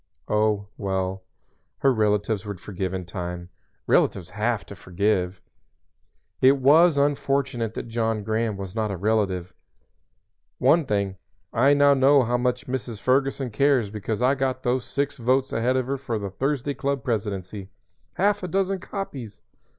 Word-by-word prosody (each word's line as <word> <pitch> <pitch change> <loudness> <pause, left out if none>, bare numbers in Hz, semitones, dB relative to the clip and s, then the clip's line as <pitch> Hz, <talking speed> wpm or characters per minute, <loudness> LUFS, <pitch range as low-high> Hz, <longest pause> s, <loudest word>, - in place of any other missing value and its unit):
Oh, 105 -1 +1
well, 95 -1 -2 0.6
her 135 -1 +3
relatives 105 -1 +1
would 100 -4 -6
forgive 95 -1 -4
in 95 -1 -4
time. 90 0 -6 0.4
Relatives 90 -2 +1
have 110 +2 -1
to 100 - -10
forgive. 90 0 -1 1.0
It 135 +2 +6
was 150 +4 +5
unfortunate 135 -5 0
that - - -5
John 115 -2 -1
Graham 110 0 -1
was 95 -1 -6
not 110 -1 -1
a 100 - -3
relative. 95 -3 0 1.0
"One 165 -4 +3
thing, 100 -2 -1 0.4
I 135 +5 +4
know 145 0 +5
now 135 0 +5
how 120 +1 +1
much 125 0 -1
Mrs. 125 -4 -4
Ferguson 135 0 +1
cares 130 -3 +2
because 110 +2 -3
I 130 +2 +4
got 130 -1 -2
those 125 0 0
six 140 0 -2
votes 130 +2 +1
ahead 125 +3 +1
of 130 - 0
her 135 +1 -3
for 120 -4 -3
the 100 -2 -5
Thursday 140 +5 -1
Club 135 -1 -2
presidency 100 -4 -3 0.5
Half 205 +2 +2
a 180 - -3
dozen 195 +2 0
copies!" 140 - -7
115 Hz, 150 wpm, -24 LUFS, 100-135 Hz, 1.0 s, It